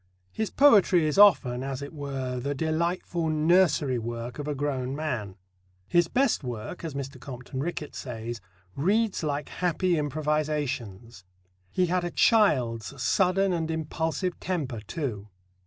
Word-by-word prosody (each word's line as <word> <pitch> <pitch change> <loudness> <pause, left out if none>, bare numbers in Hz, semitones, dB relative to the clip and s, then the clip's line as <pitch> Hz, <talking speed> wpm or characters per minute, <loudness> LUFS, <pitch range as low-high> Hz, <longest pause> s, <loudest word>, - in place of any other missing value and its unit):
His 220 -1 -2
poetry 205 - +5
is 155 +6 +1
often, 130 -12 +6
as 135 0 -4
it 140 - -8
were, 135 -4 -4
the 140 +3 -2
delightful 165 +2 -1
nursery 155 -4 +3
work 120 +3 -5
of 145 - -4
a 150 - -1
grown 135 -2 -2
man. 125 -11 -3 0.5
"His 175 -1 +3
best 260 - +1
work," 120 +6 -6
as 160 -4 -5
Mr. 140 -1 -5
Compton 130 0 -7
Rickett 150 0 -4
says, 115 -2 -6 0.3
"reads 205 +8 +1
like 150 -2 -2
happy 180 -1 0
improvisations." 145 -8 -2 0.5
He 180 - +1
had 180 +1 0
a 175 - -1
child's 135 - +2
sudden 190 +6 +2
and 165 -2 -1
impulsive 160 +2 -2
temper, 145 -11 -3
too. 110 - -5
150 Hz, 140 wpm, -27 LUFS, 125-175 Hz, 0.5 s, often